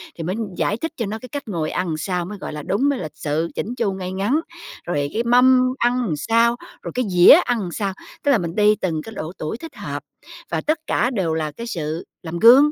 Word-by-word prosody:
Thì 165 - -5
mới 180 +4 -2 0.2
giải 210 - 0
thích 325 +7 -3
cho 230 - -1
nó 215 +2 -4
cái 255 - -10
cách 285 0 -6
ngồi 165 -6 -2
ăn 175 -4 -1
sao 180 +2 -2
mới 205 +3 -7
gọi 185 - -6
là 150 - -5
đúng, 250 - +1
mới 280 -3 0
lịch 155 -3 -6
sự, 155 +2 -1
chỉn 235 +4 -3
chu, 200 -5 0
ngay 185 -1 -5
ngắn. 200 +10 +1 0.5
Rồi 145 -4 -1
cái 230 - 0
mâm 255 +1 +5
ăn 240 - +1
sao, 230 +8 +3 0.3
rồi - - -6
cái 250 0 +1
dĩa 180 -1 +8
ăn 220 -7 -1
sao, 195 +1 -2 0.3
tức 285 - +3
là 265 - +5
mình 170 -3 -4
đi 210 0 +5
từng 165 -6 -2
cái 225 - -9
độ 155 -1 -4
tuổi 155 +8 -4
thích 325 +5 -10
hợp, - - -5 0.5
và - - 0
tất 310 +1 0
cả 245 - +2
đều 180 -7 0
là 155 -1 -1
cái 230 +10 -7
sự 160 -6 -3 0.2
làm 170 0 -4
gương, 265 +8 +8
200 Hz, 240 wpm, -21 LUFS, 170-240 Hz, 0.5 s, dĩa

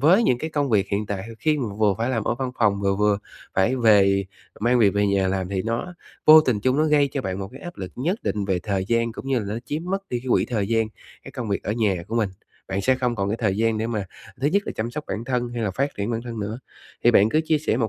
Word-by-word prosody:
với 180 - +5
những 125 - +2
cái 160 +5 -4
công 145 -3 0
việc 100 -2 +3
hiện 100 +1 -1
tại 95 -1 -3
h 115 - -9
khi 155 +2 +1
mà 110 -6 -3
vừa 105 -3 +3
phải 120 +3 0
làm 115 -4 -1
ở 120 - 0
văn 130 0 -3
phòng 100 -3 +2
vừa 100 -1 +1
vừa 105 -1 +2 0.4
phải 95 +8 +2
về 100 -4 +4 0.4
mang 120 +2 +3
việc 105 -4 +5
về 100 0 +2
nhà 100 -1 +2
làm 95 -1 -1
thì 95 -2 -2
nó 115 +11 -3 0.3
vô 155 +1 +10
tình 120 -9 0
chung 130 +3 +2
nó 155 - +4
gây 150 -2 +3
cho 135 - -2
bạn 95 0 -3
một 95 -1 -5
cái 135 - -11
áp 175 -1 -8
lực 95 -2 -7
nhất 175 - -1
định 105 -2 -1
về 95 -2 0
thời 95 -3 -1
gian 115 -1 +1
cũng 130 - -8
như 135 -2 +2
là 105 - -4
nó 115 - -3
chiếm 150 +5 -3
mất 195 +2 -3
đi 120 -1 -2
cái 130 - -13
quỹ - - +4
thời 105 -4 -2
gian 115 -1 +2 0.4
cái - - -10
công 120 -4 -5
việc 100 - -1
ở 105 - -2
nhà 105 -6 0
của 115 - -2
mình, 105 -4 +1 0.4
bạn 95 +1 -1
sẽ 130 +3 +3
không 125 -2 -1
còn 100 -1 -1
cái 110 - -1
thời 100 -4 +1
gian 115 0 +1
để 110 - -1
mà 110 -4 -2 0.4
thứ 140 - +1
nhất 200 +5 +2
là - - -3
chăm 115 +2 -2
sóc 150 +5 -5
bản 110 +2 -4
thân 125 -1 -1
hay 120 -1 -4
là 100 - 0
phát 135 +8 -2
triển 100 +3 -2
bản 115 0 -2
thân 115 -3 -6
nữa. 105 +4 -4 0.5
Thì - - +7
bạn 105 - +5
cứ 155 +7 +2
chia 155 -1 +2
sẻ 150 - 0
một 115 -3 0
115 Hz, 300 wpm, -23 LUFS, 100-130 Hz, 0.5 s, vô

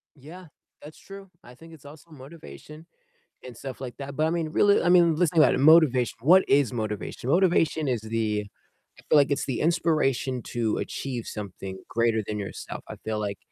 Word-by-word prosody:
Yeah, 165 +7 -13 0.4
that's 150 +1 -13
true, 195 -1 -12
I 125 +1 -15
think 165 +3 -15
it's 145 -3 -17
also 150 +3 -15
motivation 155 +2 -13 0.6
and 125 -3 -11
stuff 135 -1 -8
like 125 -2 -7
that, 140 0 -8
but 155 +1 +1
I - - 0
mean, 165 -2 -2
really, 205 +5 +3
I 175 - +2
mean, 170 -3 +5
let's 170 -2 +1
think 160 -3 +5
about - - +3
it, - - -2
motivation, 140 -5 +4
what 180 +8 +5
is 140 -3 +3
motivation? 110 +2 -5
Motivation 165 -3 +2
is 120 -4 -1
the 110 -2 -2 0.5
I - - -18
feel 155 - +5
like 145 0 +3
it's 140 - -1
the 130 - -3
inspiration 150 -6 0
to 115 -3 -1
achieve 125 -4 -5
something 95 -2 -7
greater 115 -1 +1
than 105 - -4
yourself, 100 - -7
I - - -7
feel 110 -1 -2
like, 100 -2 -4
140 Hz, 195 wpm, -25 LUFS, 115-160 Hz, 0.6 s, mean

